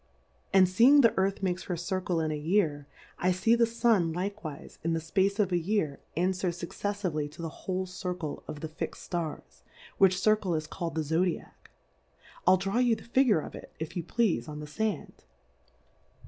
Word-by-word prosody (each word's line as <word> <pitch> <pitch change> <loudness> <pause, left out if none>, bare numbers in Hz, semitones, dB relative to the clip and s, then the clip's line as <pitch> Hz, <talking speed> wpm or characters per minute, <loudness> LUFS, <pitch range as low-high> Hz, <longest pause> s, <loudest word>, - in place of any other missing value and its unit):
And 190 -2 +6
feeing 240 +10 +6
the 230 -3 +4
Earth 195 +1 0
makes 185 -1 -1
her 180 - -2
Circle 180 0 -1
in 155 -1 -1
a - - -1
Year, 150 -2 0 0.3
I 185 - +2
fee 190 +6 +2
the 235 0 +4
Sun 225 -8 +2
like 200 +4 -3
wife 150 -3 -8
in 165 +1 +1
the 165 - 0
fpace 190 +5 +1
of 200 -3 +1
a 175 - +2
Year 170 -5 -1 0.2
anfwer 185 +1 +1
fuc 170 0 -7
ceffively 185 -8 -2
to 160 +3 -10
the 165 - -2 0.2
whole 185 0 0
Circle 180 -4 -5
of 145 - -7
the 160 - -3
fix'd 155 +1 -6
Stars, 170 -4 -5 0.4
which 185 -1 +5
Circle 210 -4 +2
is 155 0 -2
calPd 170 0 -4
the 160 - +1
Zj;^diack: 160 +3 0 1.0
rU 185 +1 +7
draw 195 +5 -1
you 245 -2 +4
the - - -12
Figure 235 - +3
of - - -8
it, - - -11
if 160 +1 -6
you 175 - -1
pleafe, 200 -1 0
on 150 0 -6
the 150 - -6
Sand? 210 +8 -3
185 Hz, 190 wpm, -29 LUFS, 160-205 Hz, 1.0 s, rU